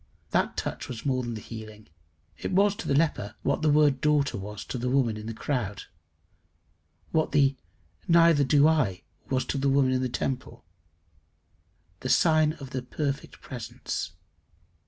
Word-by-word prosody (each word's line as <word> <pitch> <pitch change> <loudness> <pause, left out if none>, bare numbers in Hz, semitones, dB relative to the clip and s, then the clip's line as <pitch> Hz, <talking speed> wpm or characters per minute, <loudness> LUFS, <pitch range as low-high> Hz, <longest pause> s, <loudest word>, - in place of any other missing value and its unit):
That - - +1
touch - - -4
was 115 -3 -7
more 130 -2 +1
than 120 -2 -4
the 110 - -6
healing. 110 -1 -10 0.5
It - - -5
was 200 +2 +3
to 230 - -6
the 140 - +2
leper 140 -9 0
what - - 0
the 155 - +3
word 145 -3 +4
Daughter 150 -2 +2
was 105 +1 -6
to 125 - -4
the 125 +1 -1
woman 125 -4 +2
in 110 0 -7
the - - -3
crowd, 110 -7 -2 1.3
what 160 -1 +1
the 140 -2 +4 0.5
Neither 165 -3 +6
do 145 +2 +5
I 125 - +1 0.3
was 130 -1 0
to 140 - -2
the 140 +1 +2
woman 135 -1 +3
in 130 0 +1
the 130 - -1
temple 125 - -4 1.3
the 130 - -4
sign 155 -1 +4
of 135 -5 -10
the 130 - -2
perfect 140 +2 -4
presence. 80 - -5
135 Hz, 165 wpm, -27 LUFS, 120-150 Hz, 1.3 s, Neither